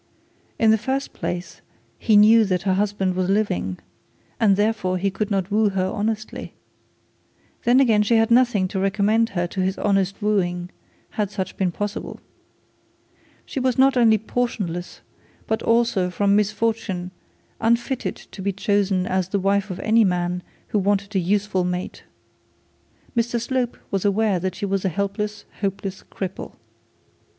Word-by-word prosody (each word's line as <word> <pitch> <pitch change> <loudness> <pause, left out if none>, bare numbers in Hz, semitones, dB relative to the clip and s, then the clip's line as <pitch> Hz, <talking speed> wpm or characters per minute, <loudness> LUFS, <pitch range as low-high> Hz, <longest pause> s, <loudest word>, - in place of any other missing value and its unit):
In 220 -1 +4
the 220 - +3
first 270 +4 -2
place 175 -1 -5 0.4
he 215 -3 +4
knew 220 +2 +7
that 185 -3 -1
her 190 -1 +2
husband 195 -1 0
was 185 0 0
living, 95 - 0 0.6
and 205 -4 +4
therefore 205 -3 0
he 195 +2 0
could 205 +2 -2
not 195 -1 -1
woo 215 0 +3
her 190 -1 0
honestly. 215 +3 -3 1.1
Then 245 +2 +5
again 225 -6 +4
she 210 +3 +2
had 225 0 +3
nothing 235 -6 +4
to 195 - -3
recommend 205 +4 +2
her 175 - +1
to 185 +2 -3
his 190 +1 0
honest 195 -1 0
wooing 180 -4 0 0.5
had 205 - 0
such 190 -2 -4
been 185 -2 0
possible. 205 +3 -5 1.3
She - - -4
was 255 -1 0
not 270 +1 +5
only 230 -3 +5
portionless, 205 -6 -3 0.4
but 220 - -1
also 230 -6 +2
from 200 +2 +2
misfortune 210 -3 -1 0.5
unfitted 235 +3 0
to 195 - -12
be 200 +1 0
chosen 200 -1 +1
as 185 -1 -1
the 200 - 0
wife 200 +1 +1
of 185 - -5
any 225 +1 +4
man 180 -2 0 0.3
who 210 - +1
wanted 200 +1 0
a - - +4
useful 195 +1 0
mate. 180 0 -4 1.1
Mr 235 0 +1
Slope 245 0 -2
was 195 -2 0
aware 205 -1 +2
that 185 +1 -3
she 205 - -3
was 195 -1 -1
a 190 - +1
helpless 200 +4 -3
hopeless 195 -1 -3
cripple. 190 -1 -6
200 Hz, 155 wpm, -22 LUFS, 185-220 Hz, 1.3 s, knew